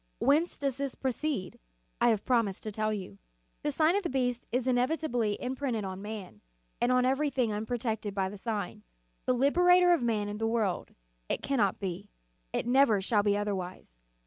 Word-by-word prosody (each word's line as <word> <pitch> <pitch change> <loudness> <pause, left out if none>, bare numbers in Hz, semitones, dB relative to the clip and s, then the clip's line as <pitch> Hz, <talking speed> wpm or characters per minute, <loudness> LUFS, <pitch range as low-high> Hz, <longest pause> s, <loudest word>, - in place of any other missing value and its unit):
Whence 305 +6 +2
does 275 -2 -2
this 275 -2 -3
proceed? 260 -6 -2 0.4
I 240 - +6
have 220 -3 +1
promised 230 -7 +1
to 215 - -4
tell 215 +1 -1
you. 185 - -6 0.4
The 295 - -1
sign 315 +5 +3
of 405 - +2
the 345 - -3
beast 245 -2 -1
is 250 +1 0
inevitably 245 -4 +1
imprinted 255 -3 -2
on 190 0 -5
man, 205 - -7 0.4
and 240 - +3
on 250 0 +4
every 270 +3 +2
thing 245 -6 0
unprotected 220 -1 -2
by 190 -1 +1
the 195 - -7
sign, 210 -4 -3 0.5
the 255 - +4
liberator 355 +7 +5
of 340 - +2
man 220 -3 0
and 210 +1 -5
the 225 - +2
world: 225 -5 -1 0.3
it - - -2
cannot 230 -9 +1
be, 185 -4 -5 0.4
it - - -1
never 245 -4 +4
shall 205 +2 +2
be 205 0 +2
otherwise. 185 - -4
235 Hz, 180 wpm, -30 LUFS, 205-270 Hz, 0.5 s, I